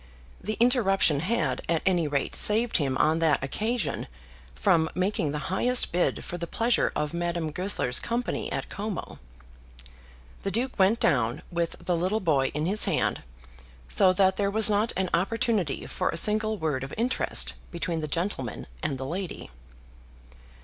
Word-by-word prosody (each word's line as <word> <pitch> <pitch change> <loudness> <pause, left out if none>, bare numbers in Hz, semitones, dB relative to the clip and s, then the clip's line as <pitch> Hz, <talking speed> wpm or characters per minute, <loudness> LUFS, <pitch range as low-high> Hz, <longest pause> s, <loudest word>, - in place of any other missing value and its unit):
The 215 +3 -3
interruption 195 - +3
had, 155 - -1
at 165 -2 +1
any 175 -4 +2
rate, 140 -2 -1
saved 225 +3 +4
him 135 -5 0
on 160 +1 +2
that 160 -4 +2
occasion 210 - -2 0.5
from 165 -4 +2
making 185 -5 0
the 150 +5 -4
highest 250 +5 +3
bid 175 +1 0
for 175 - -5
the 170 - -4
pleasure 230 +5 +1
of 150 +1 -2
Madame 170 -2 -2
Goesler's 180 -7 0
company 235 0 -3
at - - -3
Como. 205 -2 -5 1.2
The - - -2
Duke 240 +3 -2
went 195 +5 +4
down 120 -3 +1
with 170 -1 -2
the 175 +1 -1
little 185 +6 0
boy 150 -9 +2
in 150 +1 -1
his 205 +5 +1
hand, - - 0 0.7
so 185 - +4
that 190 0 +3
there 200 -1 +1
was 215 +1 +5
not 210 +3 +2
an 190 -1 -1
opportunity 195 - 0
for - - -2
a - - -2
single 215 +3 +1
word 150 -7 -2
of 135 - -7
interest 240 +3 0 0.2
between 170 -1 -3
the 155 - -3
gentleman 150 - -3 0.2
and 135 - -2
the 130 - -5
lady. 180 +5 -5
180 Hz, 160 wpm, -27 LUFS, 155-210 Hz, 1.2 s, was